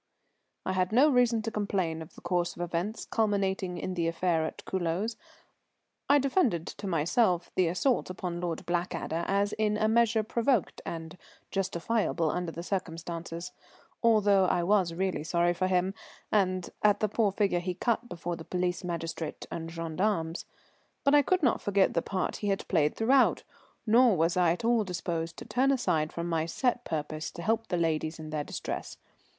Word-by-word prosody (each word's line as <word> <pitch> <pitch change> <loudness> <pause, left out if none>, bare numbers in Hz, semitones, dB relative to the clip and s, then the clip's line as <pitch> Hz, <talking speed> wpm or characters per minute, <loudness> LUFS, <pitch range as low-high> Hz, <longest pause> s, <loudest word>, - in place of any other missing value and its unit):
_] - - -52 0.6
I - - 0
had 185 0 +1
no 270 +7 +5
reason 245 -3 +3
to 225 - -3
complain 190 -6 -1
of 160 - -11
the - - -13
course 175 -1 -1
of - - -7
events 175 +6 -3
culminating 195 -4 0
in 185 - -3
the 170 -2 0
affair 165 -1 +1
at - - -9
Culoz. 190 +5 -1 0.9
I 285 - +7
defended 270 - +1
to 200 - -7
myself 175 +2 +1
the 185 -2 +2
assault 185 +9 +1
upon 180 -1 -4
Lord 170 -2 -3
Blackadder 175 -1 -2
as 200 +1 +1
in 210 -1 +1
a 215 - +2
measure 225 0 +3
provoked 235 0 0
and 165 +2 -6 0.3
justifiable 190 -3 0
under 180 -2 -2
the 170 +1 -7
circumstances, 170 -1 -4 0.5
although 205 -5 +4
I 175 -1 +1
was 185 -2 +3
really 185 -4 -1
sorry 175 +2 +2
for 185 +2 0
him 185 +1 +1 0.4
and 185 -3 +1
at 210 -1 +4
the 215 - +2
poor 210 0 +1
figure 195 -3 +1
he 180 0 -3
cut 235 +3 -1
before 175 0 -4
the 165 - -9
police 180 0 -2
magistrate 165 -2 -4
and 165 -1 -4
gendarmes. 165 +1 -2 0.6
But 280 -1 +4
I 290 - +7
could 365 +4 +1
not 250 - +3
forget 200 -1 +2
the 170 - +1
part 190 +1 -2
he 205 - -3
had 195 -1 -1
played 150 -5 +2
throughout, 255 +4 +3 0.4
nor 230 -2 +5
was 165 +2 +2
I 180 -2 +4
at 200 +6 -5
all 235 -2 +3
disposed 170 -3 -3
to - - -8
turn 260 +2 +2
aside 160 - +1
from 170 0 -4
my 165 -1 0
set 245 +7 0
purpose 155 0 -3
to 170 - -7
help 225 +4 0
the 175 - -1
ladies 160 -1 0
in 155 -1 -8
their 150 -1 -1
distress. - - -5
185 Hz, 180 wpm, -29 LUFS, 170-215 Hz, 0.9 s, I